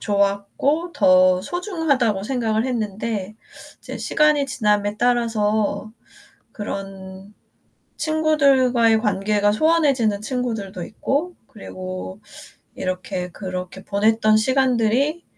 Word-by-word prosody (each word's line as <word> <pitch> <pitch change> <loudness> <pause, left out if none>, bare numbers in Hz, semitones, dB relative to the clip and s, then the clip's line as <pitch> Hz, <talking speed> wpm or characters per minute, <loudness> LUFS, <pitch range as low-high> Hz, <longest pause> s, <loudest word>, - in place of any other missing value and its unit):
좋았고 205 - 0
더 185 -2 +5
소중하다고 280 - -1
생각을 225 -2 -1
했는데 215 -3 -3 0.4
이제 - - -8
시간이 300 -2 +2
지남에 210 -5 0
따라서 220 -3 0 0.6
그런 195 -1 -7 0.6
친구들과의 270 -8 +3
관계가 205 0 +1
소원해지는 270 -6 +2
친구들도 215 -6 -4
있고 305 - -2
그리고 95 0 -8 0.6
이렇게 185 0 -4
그렇게 185 0 -7
보냈던 215 +1 +2
시간들이 260 +5 +1
215 Hz, 245 characters per minute, -21 LUFS, 195-260 Hz, 0.6 s, 더